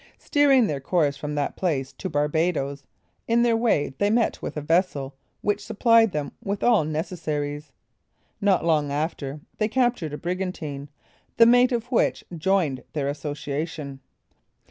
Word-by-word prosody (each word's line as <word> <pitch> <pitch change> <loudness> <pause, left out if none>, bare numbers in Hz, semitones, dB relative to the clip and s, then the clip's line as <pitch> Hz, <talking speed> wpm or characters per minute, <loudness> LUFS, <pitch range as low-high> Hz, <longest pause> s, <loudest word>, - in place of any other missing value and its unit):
Steering 280 -5 +4
their 145 -7 -2
course 145 0 +1
from 150 +1 -5
that 145 -1 -1
place 140 -8 -1
to 190 - -5
Barbadoes, 145 -2 0 0.4
in 235 +1 +3
their 235 -1 +3
way 225 - +1
they 205 - +2
met 230 +1 +1
with - - -5
a - - 0
vessel 150 -4 0 0.3
which 205 0 0
supplied 225 0 +4
them 150 -3 -3
with 200 0 -3
all 230 -8 +4
necessaries. 150 -2 -3 0.7
Not 195 -4 +2
long 150 -4 +2
after, 145 -1 -3 0.2
they 215 - +2
captured 240 - 0
a - - -3
brigantine, 170 -6 -4 0.5
the 230 - +8
mate 245 +2 +5
of 235 -2 -1
which 240 - +1
joined 165 -6 +1
their 145 -2 -1
association. 145 -1 -4
160 Hz, 145 wpm, -24 LUFS, 145-210 Hz, 0.7 s, the